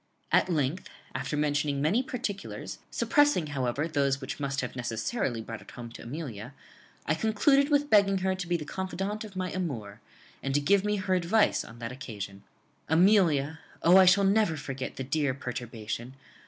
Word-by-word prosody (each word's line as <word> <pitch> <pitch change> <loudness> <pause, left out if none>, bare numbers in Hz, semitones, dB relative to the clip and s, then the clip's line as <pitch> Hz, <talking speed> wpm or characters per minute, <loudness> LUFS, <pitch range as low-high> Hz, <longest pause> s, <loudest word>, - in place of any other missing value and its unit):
At - - +4
length, 155 +1 -1 0.2
after 150 - -3
mentioning 145 -1 +1
many 165 - +2
particulars, 240 -6 -5
suppressing, 290 - +3
however, 135 +3 -1
those 140 -3 +1
which 140 +2 -6
must 140 0 -1
have 125 - -5
necessarily 120 - -2
brought 115 0 -7
it - - -14
home 120 -1 -9
to - - -10
Amelia, 125 -2 -7 0.5
I 155 - +2
concluded 275 - +3
with 290 0 +2
begging 200 -2 +5
her 190 0 0
to 185 -2 -5
be 175 0 +1
the 150 - -7
confidante 195 +5 -3
of 195 - -16
my 185 -1 -2
amour, 120 - -4 0.4
and 135 0 -2
to - - +5
give 195 +7 +3
me 210 0 +1
her 190 -1 -1
advice 185 +5 +2
on 115 - -12
that 115 0 -5
occasion. 100 -7 -7 0.5
"Amelia 160 -4 +4 0.2
(O, 175 +3 +7
I 190 - +8
shall 190 +2 +6
never 195 -4 +3
forget 135 -2 -5
the 135 - -4
dear 140 0 0
perturbation!) 120 -1 -5
155 Hz, 175 wpm, -29 LUFS, 130-195 Hz, 0.5 s, I